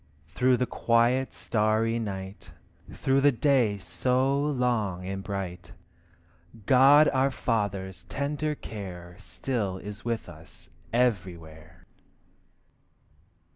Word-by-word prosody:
Through 125 Hz, 0 st, +3 dB
the 125 Hz, -, 0 dB
quiet 120 Hz, +3 st, +1 dB
starry 110 Hz, +1 st, 0 dB
night, 95 Hz, -2 st, -6 dB, 0.4 s
Through 135 Hz, +1 st, +1 dB
the 145 Hz, +1 st, +5 dB
day 125 Hz, -5 st, +2 dB
so 125 Hz, +10 st, 0 dB
long 120 Hz, -10 st, -1 dB
and 95 Hz, +1 st, -4 dB
bright, 95 Hz, 0 st, -6 dB, 0.9 s
God 140 Hz, +5 st, +6 dB
our 135 Hz, 0 st, +2 dB
Father's 100 Hz, -8 st, -2 dB
tender 150 Hz, +2 st, -2 dB
care 90 Hz, -8 st, -8 dB
Still 100 Hz, -2 st, -3 dB
is 105 Hz, +2 st, -8 dB
with 115 Hz, -1 st, -3 dB
us 80 Hz, -2 st, -14 dB, 0.2 s
everywhere. 85 Hz, -8 st, -2 dB
110 Hz, 95 wpm, -27 LUFS, 95-130 Hz, 0.9 s, God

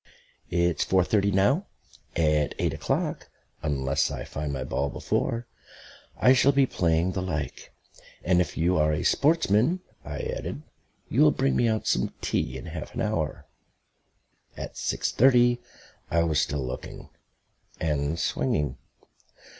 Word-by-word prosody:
It's 85 Hz, -1 st, +1 dB
four 95 Hz, -1 st, +3 dB
thirty 100 Hz, +1 st, +2 dB
now; 115 Hz, -, +2 dB, 0.5 s
at 75 Hz, -3 st, +2 dB
eight -, -, 0 dB
o'clock, -, -, -2 dB, 0.3 s
unless 70 Hz, -3 st, 0 dB
I -, -, -5 dB
find 75 Hz, 0 st, -4 dB
my 65 Hz, -2 st, -3 dB
ball 70 Hz, +2 st, -1 dB
before, 115 Hz, +10 st, -1 dB, 0.7 s
I 125 Hz, -, +6 dB
shall 135 Hz, +2 st, +5 dB
be 135 Hz, 0 st, +4 dB
playing 85 Hz, -5 st, +1 dB
the 95 Hz, -, -2 dB
like. 80 Hz, -6 st, -4 dB, 0.5 s
And 90 Hz, 0 st, +3 dB
if 90 Hz, -, -3 dB
you 85 Hz, +2 st, +2 dB
are 75 Hz, 0 st, +3 dB
a 75 Hz, -, -1 dB
sportsman," 155 Hz, -, +3 dB, 0.2 s
I -, -, -5 dB
added, 75 Hz, -, -4 dB, 0.4 s
"you -, -, +1 dB
will -, -, +8 dB
bring 70 Hz, -1 st, +1 dB
me 120 Hz, -, +3 dB
out 110 Hz, -1 st, 0 dB
some -, -, 0 dB
tea 65 Hz, -, -1 dB
in 65 Hz, -, -9 dB
half 80 Hz, +4 st, -7 dB
an 120 Hz, -, -2 dB
hour." 105 Hz, -9 st, -2 dB, 1.1 s
At -, -, -6 dB
six -, -, -1 dB
thirty 120 Hz, -1 st, +4 dB, 0.5 s
I 85 Hz, 0 st, +2 dB
was 80 Hz, -2 st, +2 dB
still 75 Hz, -6 st, -2 dB
looking 65 Hz, 0 st, -7 dB, 0.7 s
and 75 Hz, 0 st, -1 dB
swinging. 70 Hz, -1 st, -1 dB
85 Hz, 145 wpm, -26 LUFS, 75-110 Hz, 1.1 s, will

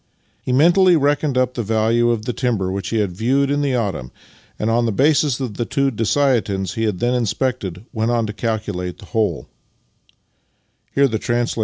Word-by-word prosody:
He -, -, -3 dB
mentally 175 Hz, +7 st, +5 dB
reckoned 145 Hz, -2 st, +1 dB
up 130 Hz, 0 st, +1 dB
the 120 Hz, -, -3 dB
value 115 Hz, +2 st, +1 dB
of 115 Hz, -2 st, -1 dB
the 125 Hz, -, -2 dB
timber 110 Hz, -8 st, -1 dB
which 95 Hz, -1 st, -4 dB
he 115 Hz, -, -1 dB
had 105 Hz, -4 st, 0 dB
viewed 130 Hz, +9 st, +1 dB
in 145 Hz, 0 st, +1 dB
the 140 Hz, -3 st, 0 dB
autumn, 100 Hz, -, -2 dB, 0.5 s
and 105 Hz, -, -2 dB
on 120 Hz, +1 st, +2 dB
the -, -, 0 dB
basis 140 Hz, +2 st, +2 dB
of 125 Hz, -6 st, -4 dB
the 120 Hz, -, 0 dB
two 140 Hz, +3 st, 0 dB
dessiatins^ 110 Hz, -6 st, 0 dB
he 115 Hz, +3 st, -1 dB
had 105 Hz, -4 st, -1 dB
then 120 Hz, +6 st, 0 dB
inspected 115 Hz, -5 st, -2 dB
went 110 Hz, 0 st, 0 dB
on 120 Hz, -1 st, +1 dB
to 105 Hz, -, -5 dB
calculate 105 Hz, -6 st, -3 dB
the -, -, -13 dB
whole. 110 Hz, -2 st, 0 dB
115 Hz, 175 wpm, -20 LUFS, 105-130 Hz, 0.5 s, mentally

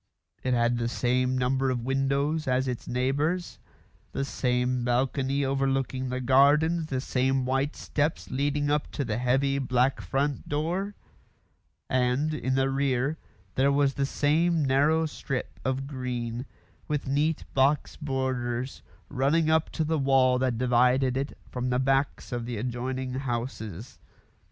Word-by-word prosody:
It 130 Hz, -1 st, +1 dB
had 120 Hz, 0 st, +2 dB
the 115 Hz, -, 0 dB
same 125 Hz, +1 st, +1 dB
number 130 Hz, +1 st, +1 dB
of 120 Hz, -2 st, -2 dB
windows 140 Hz, +3 st, 0 dB
as 130 Hz, +1 st, +1 dB
its 125 Hz, -2 st, -4 dB
neighbours; 145 Hz, +8 st, -1 dB, 0.5 s
the 135 Hz, -, -1 dB
same 125 Hz, -1 st, 0 dB
balcony 135 Hz, +3 st, +1 dB
overlooking 135 Hz, -1 st, 0 dB
the 130 Hz, 0 st, -2 dB
gardens; 145 Hz, +6 st, +4 dB
the 130 Hz, -4 st, -2 dB
same 130 Hz, 0 st, 0 dB
white 135 Hz, +3 st, 0 dB
steps 150 Hz, +2 st, -2 dB
leading 145 Hz, +2 st, 0 dB
up 150 Hz, 0 st, 0 dB
to 140 Hz, -, -2 dB
the 110 Hz, -1 st, -2 dB
heavy 135 Hz, +3 st, +2 dB
black 130 Hz, 0 st, +1 dB
front 140 Hz, +1 st, -2 dB
door; 175 Hz, +7 st, -1 dB, 0.9 s
and, 130 Hz, +4 st, +1 dB
in 130 Hz, -3 st, -1 dB
the 135 Hz, 0 st, +2 dB
rear, 135 Hz, +2 st, 0 dB, 0.3 s
there 135 Hz, +2 st, +3 dB
was 140 Hz, -1 st, +2 dB
the 140 Hz, 0 st, -1 dB
same 160 Hz, +3 st, +2 dB
narrow 145 Hz, +5 st, +3 dB
strip 140 Hz, -3 st, -4 dB
of 130 Hz, +1 st, -1 dB
green, 125 Hz, -2 st, -4 dB, 0.4 s
with 150 Hz, -2 st, -1 dB
neat 145 Hz, +4 st, 0 dB
box 140 Hz, +2 st, +2 dB
borders, 130 Hz, -3 st, -2 dB, 0.3 s
running 145 Hz, +4 st, +2 dB
up 160 Hz, 0 st, +2 dB
to 160 Hz, -, -2 dB
the 160 Hz, 0 st, 0 dB
wall 130 Hz, -2 st, +4 dB
that 130 Hz, -3 st, 0 dB
divided 125 Hz, +1 st, +3 dB
it 135 Hz, +2 st, -3 dB
from 125 Hz, 0 st, -3 dB
the 125 Hz, -, +1 dB
backs 135 Hz, +2 st, 0 dB
of 120 Hz, -1 st, -3 dB
the 120 Hz, -2 st, -3 dB
adjoining 125 Hz, +2 st, -3 dB
houses. 120 Hz, -5 st, -4 dB
135 Hz, 145 wpm, -27 LUFS, 125-145 Hz, 0.9 s, gardens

